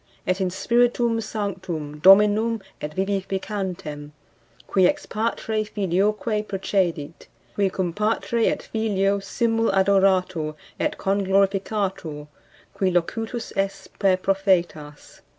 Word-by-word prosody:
Et 185 +1 0
in 185 - +1
Spiritum 235 +3 +1
Sanctum, 185 -9 -4
Dominum 210 +5 +5 0.2
et 150 0 -5
vivificantem, 190 -5 -3 0.6
qui 190 -2 +4
ex 295 0 -1
Patre 220 0 -2
[Filioque] 210 +2 -1
procedit; 180 -6 -2 0.3
qui 200 -1 +1
cum 180 -2 -2
Patre 215 +3 0
et - - -3
Filio 200 -3 0
simul 225 +3 0
adoratur 190 -5 +2 0.2
et - - -1
conglorificatur; 195 -4 0 0.5
qui 190 - +1
locutus 225 +7 -2
est 195 -1 -2
per 190 -2 +3
Prophetas. 185 -6 -1
195 Hz, 100 wpm, -23 LUFS, 185-210 Hz, 0.6 s, Dominum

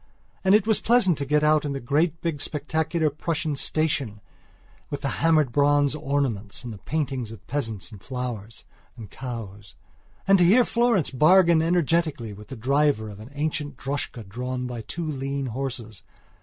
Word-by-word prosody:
And 190 +1 +5
it 210 - +3
was 220 -1 +2
pleasant 225 -7 +4
to 140 - -3
get 150 +2 +2
out 150 0 +4
in 145 -2 -2
the 135 - -3
great 150 +6 0
big 160 -4 -2
spectacular 160 +1 0
Prussian 155 0 -2
station 140 -7 -1 0.7
with 145 - -4
the 140 - -1
hammered 155 -5 +4
bronze 145 +1 +3
ornaments 135 -9 -2
and 120 -2 -6
the 100 - -11
paintings 135 -6 -3
of 105 -2 -12
peasants 115 -8 -4
and 105 -3 -11
flowers 120 -4 -6 0.3
and 110 -5 -10
cows; 105 -6 -8 0.5
and 195 -1 +6
to - - +6
hear 225 +8 +6
Florence 235 - +2
bargain 170 +4 +5
energetically 165 -8 +1
with 105 +1 -12
the 135 - -7
driver 135 -2 +1
of 100 - -11
an 110 +3 -10
ancient 145 -2 -2
droschka 135 -5 -4
drawn 125 +4 -4
by 120 -2 -5
two 165 +10 -4
lean 140 -2 -3
horses. 120 -3 -5
140 Hz, 170 wpm, -25 LUFS, 120-160 Hz, 0.7 s, and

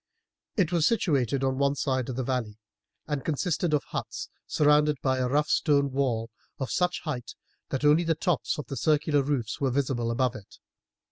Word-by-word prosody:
It 180 -5 +2
was 170 -3 +3
situated 140 - +1
on 130 0 0
one 140 0 +2
side 130 -3 -1
of 125 - -3
the 130 - -2
valley, 120 -5 -2 0.5
and 145 -3 -3
consisted 165 +2 0
of 150 -2 +2
huts - - -5 0.2
surrounded 150 0 +3
by 130 -1 +1
a 125 - +1
rough 150 +3 +2
stone 140 -3 +2
wall 120 -4 -1 0.3
of 135 - -4
such 180 -1 0
height 125 -7 -5 0.3
that 135 +2 -2
only 150 +4 +5
the 165 -1 +1
tops 170 -2 0
of 150 - -5
the 135 - -6
circular 150 +3 +2
roofs 135 -3 -2
were 135 - +2
visible 125 -3 0
above 125 +1 +1
it. 100 -2 -12
140 Hz, 185 wpm, -27 LUFS, 130-150 Hz, 0.5 s, only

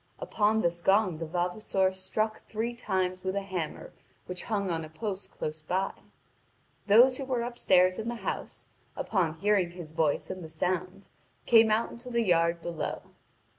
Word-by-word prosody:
Upon 220 - +1
this 170 -2 0
gong 190 -3 +3
the 165 - -4
vavasor 185 +3 0
struck 215 +3 -2
three 225 +2 -2
times 185 -5 -2
with 190 0 -2
a 200 - -1
hammer 180 -6 -5 0.3
which 180 0 -6
hung 200 -4 -1
on 165 -1 -2
a 155 - -8
post 200 +4 -5
close 155 0 -5
by. 185 +5 -1 1.0
Those 245 +5 +7
who 275 - -4
were 255 -3 -1
upstairs 185 -6 +3
in 220 +1 -3
the 240 - -3
house, - - -4 0.3
upon 175 -7 0
hearing 195 0 +2
his 170 -3 -9
voice 160 0 0
and 185 -1 -6
the 160 - -8
sound, 185 +4 -2 0.4
came 225 -2 +6
out 215 +2 +1
into 245 +2 -9
the 235 -1 +1
yard 170 -3 +2
below. 170 -2 -4
190 Hz, 170 wpm, -29 LUFS, 175-220 Hz, 1.0 s, Those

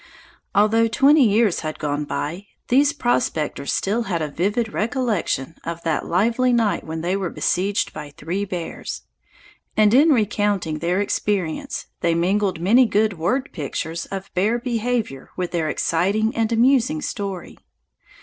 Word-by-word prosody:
Although 225 +3 +4
twenty 275 +4 +5
years 210 -2 +2
had 155 -1 -4
gone 145 0 -2
by, 155 +7 -4 0.2
these 280 +3 +4
prospectors 240 - -1
still 225 +4 0
had 170 -3 0
a 155 -2 -2
vivid 205 +7 -1
recollection 215 - -1
of 170 0 -5
that 160 -3 -1
lively 230 +8 +2
night 230 -4 +1
when 160 0 -5
they 180 +3 0
were 190 -3 -2
besieged 195 +5 0
by 150 -1 -7
three 175 +5 -3
bears, 180 -4 -5 0.7
and 215 0 +5
in 290 +6 +6
recounting 205 - +1
the 175 +3 0
experience 200 -4 -2
they 170 -1 +1
mingled 190 +1 +1
many 230 +9 +5
good 210 -4 +1
word 255 - 0
pictures 160 +2 -4
of 195 0 -7
bear 210 +6 +2
behavior 235 - -2
with 180 -1 -2
their 165 -3 -1
exciting 200 +9 0
and 225 0 0
amusing 265 +5 +3
story. 195 -4 -5
200 Hz, 145 wpm, -22 LUFS, 170-230 Hz, 0.7 s, in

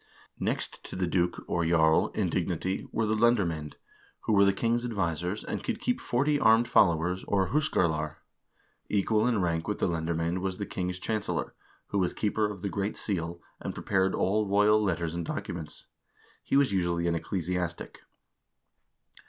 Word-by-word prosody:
Next - - -3
to - - -8
the 90 0 0
duke, 90 0 0
or 85 - 0
jarl, 80 -1 +4
in - - +1
dignity 95 +1 -2
were 115 - 0
the 110 - +1
lendermcend, 95 -10 +1 0.5
who - - 0
were 100 -1 +6
the 100 - +5
king's 115 +4 0
advisers, 95 -4 -2
and - - -4
could 235 -3 -2
keep 245 0 -1
forty 145 +4 +1
armed 115 0 +5
followers, 90 -1 +3
or 95 -2 +1
hUskarlar. 80 - +1 0.7
Equal 105 +2 +2
in 115 -5 +2
rank 80 -1 -1
with 105 - -1
the - - +1
lendermcend 85 +1 -1
was 95 0 -3
the 100 - -3
king's 90 -1 -3
chancellor, 110 +2 -2 0.4
who 100 - 0
was 90 -2 0
keeper 105 0 0
of 100 -2 -8
the - - 0
great 100 +1 -2
seal, 85 -4 -3 0.2
and - - -5
prepared 95 -1 +1
all 105 +2 +1
royal 105 +2 +4
letters 85 -5 -1
and 85 0 -3
documents. 80 -3 -5 0.6
He - - +2
was 140 -4 +3
usually 85 -2 0
an 85 - +2
ecclesiastic. 90 +1 -3
95 Hz, 165 wpm, -29 LUFS, 85-105 Hz, 0.7 s, were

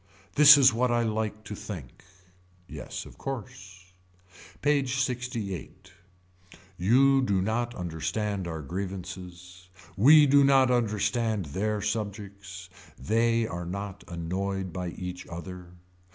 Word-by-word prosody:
This 150 0 +9
is 130 -3 +6
what 125 +2 +1
I 120 0 +1
like 110 -1 -2
to 105 - -8
think. 100 - -9 0.6
Yes - - -7
of - - -15
course. 95 -7 -8 0.7
PAGE 140 -3 +1
LXVIII. 120 -7 -5 1.1
You 130 +9 +4
do 100 -7 +1
not 120 +5 -1
understand 90 +3 -3
our 80 -2 -5
grievances. 90 +1 -7 0.3
We 145 +8 +7
do 140 0 +5
not 135 -2 +4
understand 110 -2 0
their 105 +7 -2
subjects. 100 -3 -5 0.3
They 115 +1 +1
are 90 -4 -5
not 100 +2 -6
annoyed 95 +2 -4
by 90 0 -4
each 90 +1 -7
other. 90 +1 -8
100 Hz, 115 wpm, -27 LUFS, 90-120 Hz, 1.1 s, This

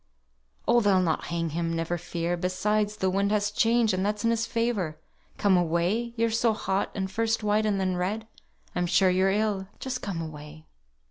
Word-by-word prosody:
"Oh! 240 +1 +5
they'll 200 -3 +4
not 170 -3 0
hang 170 -1 -2
him! 165 +1 -1
never 165 +1 -1
fear! 175 0 -2
Besides 210 +4 0
the 190 -2 +1
wind 200 +2 +1
has 210 0 +1
changed, 225 0 +3
and 185 0 0
that's 210 +1 -1
in 230 - +3
his 230 -1 0
favour. 225 -9 -1 0.4
Come 200 -2 +3
away. 180 +8 0
You're 230 0 +2
so 225 0 +2
hot, 195 -2 -1
and 190 -1 -2
first 225 +1 0
white 210 +1 +2
and 200 -2 +1
then 185 -1 0
red; 200 +5 -2 0.5
I'm 180 0 0
sure 185 +2 +4
you're 185 +1 +3
ill. 200 -1 0
Just 260 -1 -4
come 195 -5 -4
away." 155 -1 -8
195 Hz, 190 wpm, -27 LUFS, 175-215 Hz, 0.5 s, Oh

